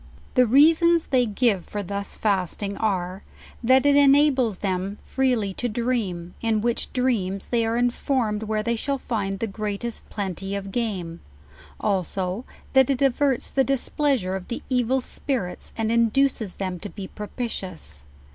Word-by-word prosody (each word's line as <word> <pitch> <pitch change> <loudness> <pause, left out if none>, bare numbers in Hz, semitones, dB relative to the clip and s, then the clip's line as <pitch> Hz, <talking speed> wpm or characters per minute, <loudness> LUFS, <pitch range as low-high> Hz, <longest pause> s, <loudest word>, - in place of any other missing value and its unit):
The 250 -1 +5
reasons 325 +6 +5
they 250 -3 +2
give 210 -3 +2
for 205 -1 -4
thus 200 +1 -4
fasting, 200 0 -1
are, 190 -3 -1 0.4
that 260 +3 +5
it 285 0 +5
enables 275 -6 +4
them 195 +1 -2
freely 245 -7 0
to 245 +5 -2
dream, 210 -7 -2
in 225 -2 +1
which 235 +1 -1
dreams 210 -7 0
they 230 -2 +2
are 230 +1 0
informed 245 -3 0
where 215 -1 -1
they 235 +1 0
shall 275 +5 -1
find 200 -6 -2
the 225 - -2
greatest 215 +2 -4
plenty 195 -1 -4
of 195 -1 -5
game; 190 -8 -2 0.6
also, 190 +2 -1 0.3
that 265 -1 +5
it 275 0 +1
averts 270 -1 +1
the 270 - +3
displeasure 270 -6 +1
of 190 -1 -6
the 240 - -5
evil 255 +1 +2
spirits, 245 -8 -3
and 225 0 0
induces 230 -2 +2
them 185 -2 -3
to 205 - -6
be 195 -1 -7
propitious. 190 - -5
220 Hz, 150 wpm, -24 LUFS, 195-255 Hz, 0.6 s, The